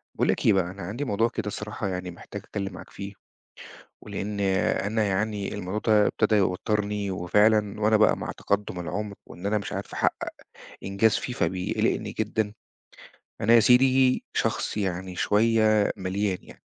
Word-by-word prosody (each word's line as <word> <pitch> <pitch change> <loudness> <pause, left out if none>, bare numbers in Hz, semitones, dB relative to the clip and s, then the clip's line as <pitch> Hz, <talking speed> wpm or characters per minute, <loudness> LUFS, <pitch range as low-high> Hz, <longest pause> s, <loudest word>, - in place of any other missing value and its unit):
باقول - - +1
لك - - +1
بقى، 95 -2 +3
أنا 100 - -10
عندي 110 +11 -4
موضوع 115 0 +1
كده 105 -3 -4
صراحة 105 0 -4
يعني، 90 -1 -4
محتاج 100 +3 -9
أتكلَّم 100 -2 -4
معاك - - -10
فيه، 100 +1 -8 0.9
ولإن 100 0 -5
أنا 100 +2 +1
يعني 105 +1 -1
الموضوع 105 0 -3 0.2
ده 105 -1 +5
ابتدى 110 0 +1
يوتِّرني، 105 +1 0
وفعلًا 105 +3 +2
وأنا 110 +1 +4
بقى 105 - +4
مع - - -5
تقدُّم 100 -3 -2
العُمر 105 +4 -4
وإن 90 +3 -8
أنا 105 +1 +2
مش 100 - -6
عارف - - -5
أحقِّق - - 0 0.6
إنجاز 100 +3 +2
فيه، 125 - -4
فبيقلِّقني 90 -3 -1
جدًا. 105 -2 -1 0.9
أنا 115 +3 +4
يا 115 - +8
سيدي 130 +2 +4
شخص - - 0
يعني 95 -2 -3
شوية 110 +1 +3
مليان 95 0 -1
يعني، - - -16
105 Hz, 155 wpm, -26 LUFS, 95-110 Hz, 0.9 s, يا